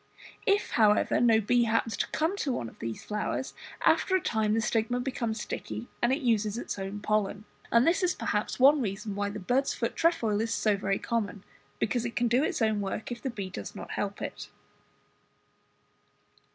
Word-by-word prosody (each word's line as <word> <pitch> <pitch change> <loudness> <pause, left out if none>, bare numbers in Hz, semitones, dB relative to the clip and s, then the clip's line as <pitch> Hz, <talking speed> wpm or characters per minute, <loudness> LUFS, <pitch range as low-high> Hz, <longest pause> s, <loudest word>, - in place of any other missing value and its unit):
If 405 0 +2
however 215 -2 +3
no 230 -2 +5
bee 240 +3 +3
happens 225 -1 +1
to - - 0
come 325 +5 0
to 285 - -1
one 120 - -3
of - - -14
these 115 -1 -5
flowers, 210 +5 -2 0.3
after 375 - +4
a - - +4
time 220 -8 +1
the - - +2
stigma 225 +2 0
becomes 235 -3 -2
sticky 225 +2 -5
and 240 - +3
it 275 +2 0
uses 220 -3 +1
its 240 - -4
own 195 +2 -5
pollen: 210 -1 0 0.3
and 235 +2 +5
this 335 +3 +3
is 360 0 +1
perhaps 210 0 -1
one 280 +3 +6
reason 205 -1 -3
why 205 0 -1
the 205 - -6
bird's 250 +8 0
foot 230 - -2
trefoil 230 -11 +2
is 225 0 -2
so 210 -1 +2
very 195 0 0
common, 210 -4 -2 0.3
because 235 +2 0
it 235 -1 -4
can 240 - +2
do 245 +4 +3
its 255 - 0
own 215 -2 +2
work 200 +4 -4
if 240 - -5
the 270 - -2
bee 200 -6 -5
does 100 - -7
not - - -7
help - - -3
it. - - -6
225 Hz, 195 wpm, -29 LUFS, 210-245 Hz, 0.3 s, one